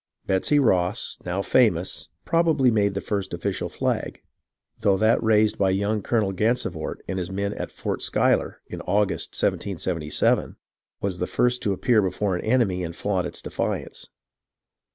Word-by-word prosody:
Betsey 95 +10 +2
Ross, 90 -10 +1
now 95 +3 -1
famous, 100 -9 +1 0.2
probably 160 -6 +3
made 100 -3 +1
the 100 - -2
first 100 -3 -3
official 95 +3 -3
flag, - - -2 0.6
though 100 -2 +3
that 110 +3 +3
raised 110 -1 +3
by 95 - +3
young 100 +3 0
Colonel 105 -2 0
Gansevoort 115 +6 -1
and 95 - -2
his 90 0 -4
men 100 +1 -2
at - - -5
Fort - - -4
Schuyler, - - +1
in - - -7
August, 100 +2 0
1777, 80 -5 0 0.5
was 95 -3 -2
the 90 - -1
first 125 0 +1
to 100 - 0
appear 110 +3 +3
before 95 0 -1
an 90 - -4
enemy 110 -6 +1
and 85 -1 -5
flaunt 95 -1 -1
its 85 - -5
defiance. - - -4
100 Hz, 155 wpm, -24 LUFS, 95-110 Hz, 0.6 s, probably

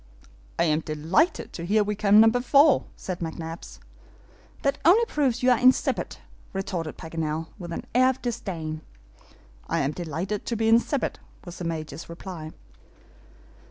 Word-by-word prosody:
"I - - +3
am 155 -2 +2
delighted 160 - 0
to 170 - -6
hear 210 +5 +3
we 210 +1 -2
come 210 0 +5
number 225 +2 +5
four," 280 +3 +5
said 185 -2 -5
McNabbs. 165 0 -6 0.9
"That 275 - +1
only 400 +9 +6
proves 265 - 0
you 255 - +5
are 245 - +3
insipid," 255 +1 +2 0.4
retorted 185 -5 -4
Paganel, 160 0 -4
with 175 -2 -7
an - - -5
air 255 +2 +5
of 260 - -2
disdain. 175 -10 -4 0.9
"I - - +1
am 140 +1 0
delighted 175 +5 -4
to 235 - -1
be 225 0 0
insipid," 235 +5 +2 0.3
was 175 -1 -9
the 175 - -4
Major's 160 -2 -5
reply. 170 -2 -7
190 Hz, 150 wpm, -25 LUFS, 165-245 Hz, 0.9 s, only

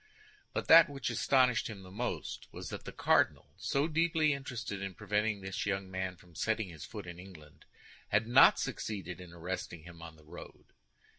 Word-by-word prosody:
But - - -3
that 165 -1 +9
which 135 -5 -3
astonished 125 -4 +3
him 105 -4 -8
most 100 +6 -5
was - - -7
that - - -7
the - - -6
cardinal, - - +2
so 140 +3 0
deeply 160 -1 +2
interested 115 -7 -5
in 95 -2 -5
preventing 105 0 0
this 95 +1 -4
young 95 -1 -2
man 95 -1 -3
from 90 0 -20
setting 110 +3 -1
his 80 -4 -9
foot - - -8
in 85 0 -9
England, 85 -6 -14 0.4
had 105 +2 +2
not 125 +3 +7
succeeded 95 -4 -4
in 90 -2 -11
arresting 85 -1 -5
him 85 -1 -12
on 85 -1 -9
the 75 -1 -20
road. - - -12
100 Hz, 175 wpm, -32 LUFS, 90-120 Hz, 0.4 s, that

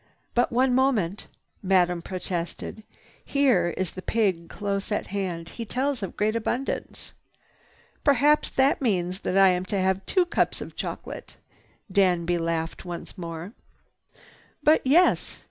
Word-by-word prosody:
"But 245 - +2
one 255 +2 +3
moment!" 230 -8 +1 0.3
Madame 180 -2 +2
protested. 180 +3 -5 0.4
"Here 260 -11 +3
is 185 -3 -1
the 185 - -8
pig 190 -7 0
close 200 0 -3
at 210 - 0
hand. 175 -4 -3
He 230 - -6
tells 260 +3 -1
of 195 - -5
great 215 +2 +1
abundance." 240 +4 -3 0.9
"Perhaps 290 +2 +4
that 270 +4 +2
means 185 -6 0
that 190 - -1
I 195 -1 +7
am 180 0 +1
to 205 +1 -2
have 190 0 +1
two 370 -2 +3
cups 345 - 0
of - - -8
chocolate." - - -6 0.5
Danby 175 -3 +2
laughed 165 0 -2
once 175 -2 -7
more. 170 +2 -7 1.1
"But 310 +1 +5
yes!" 325 +8 +3
195 Hz, 135 wpm, -26 LUFS, 175-250 Hz, 1.1 s, I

